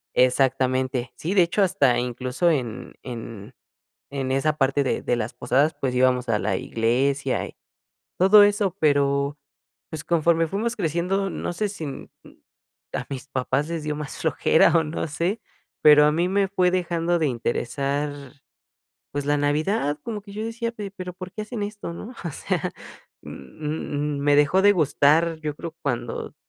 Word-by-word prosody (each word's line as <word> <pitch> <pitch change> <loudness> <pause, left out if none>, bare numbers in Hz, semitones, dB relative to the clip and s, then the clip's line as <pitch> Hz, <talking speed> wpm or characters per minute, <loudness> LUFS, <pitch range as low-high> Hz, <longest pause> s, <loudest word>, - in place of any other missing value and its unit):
Exactamente. 130 -1 +2
Sí, 170 +5 -3
de 185 -3 +6
hecho 170 +5 0
hasta 175 -10 +3
incluso 125 +7 -1
en 125 -6 -2
en 115 -2 -8 0.6
en 135 -2 -2
esa 150 +3 +1
parte 135 0 +2
de 130 - -1
de 120 - 0
las 115 0 -3
posadas 145 +5 +1
pues 130 -2 -1
íbamos 125 -1 +2
a 105 -2 +2
la 95 -2 0
iglesia 130 +6 0
y - - -13 0.6
todo 205 +3 +7
eso 205 -3 +2
pero 140 -1 +2 0.5
pues 155 -2 -6
conforme 165 0 +2
fuimos 225 +7 -2
creciendo 180 +3 -1
no 175 - -4
sé 205 +4 -1
si 195 -5 -7
m 140 - -7
m - - -17 0.6
a - - -3
mis 135 +1 -6
papás 135 +3 -1
les 165 -2 -3
dio 150 0 -2
más 150 -1 -6
flojera 160 +1 +3
o 160 - +2
no 155 +1 -3
sé 170 +9 -2 0.4
pero 150 -1 +8
a 150 - +4
mí 170 +4 +1
me 195 0 +2
fue 185 -2 +2
dejando 175 -1 0
de 155 - +2
interesar 140 +4 -2 1.0
pues 145 0 -3
la 145 - +2
Navidad 145 +2 0
como 215 -3 -5
que 200 -1 -12
yo 215 +2 -4
decía: 230 +1 -3
"Pe 205 -4 -6
pero 185 -2 -7
¿por 185 0 -9
qué 215 - -5
hacen 210 0 -5
esto?". 205 -4 -5
¿No? 220 +8 -8
O 170 - -2
sea, - - -2 0.5
m - - -9 0.7
m 150 -1 -2
me 145 0 +3
dejó 150 +6 +4
de 205 - +7
gustar, 160 0 +3
yo 150 -1 -3
creo, 165 +1 -6
cuando 120 -4 -3
150 Hz, 170 wpm, -24 LUFS, 135-180 Hz, 1.0 s, pero